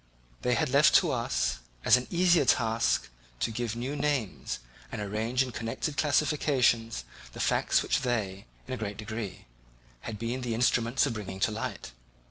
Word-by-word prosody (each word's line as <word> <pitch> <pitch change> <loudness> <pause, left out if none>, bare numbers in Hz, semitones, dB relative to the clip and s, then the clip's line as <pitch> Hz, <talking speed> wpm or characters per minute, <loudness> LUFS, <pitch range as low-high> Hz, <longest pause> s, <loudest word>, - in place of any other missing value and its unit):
They 125 0 +2
had 115 - +1
left 145 +4 +6
to 175 -5 +5
us, 115 - 0 0.3
as - - +8
an 125 0 -1
easier 175 -2 +4
task, 115 - +2 0.3
to 115 - 0
give 115 0 -3
new 125 +5 -3
names 135 - -1 0.3
and - - -4
arrange 110 +5 0
in 130 - -6
connected 115 +6 -3
classifications 135 - +2 0.3
the - - -9
facts - - +2
which - - +1
they 105 -5 -2 0.2
in 130 - -4
a - - -2
great 105 -3 -4
degree 110 -1 -6 0.5
had 105 - -6
been 115 +4 -3
the 120 -2 -2
instruments 120 +2 +2
of 135 - -1
bringing 100 -3 -6
to 110 - +3
light. 110 - -5
120 Hz, 165 wpm, -29 LUFS, 110-130 Hz, 0.5 s, as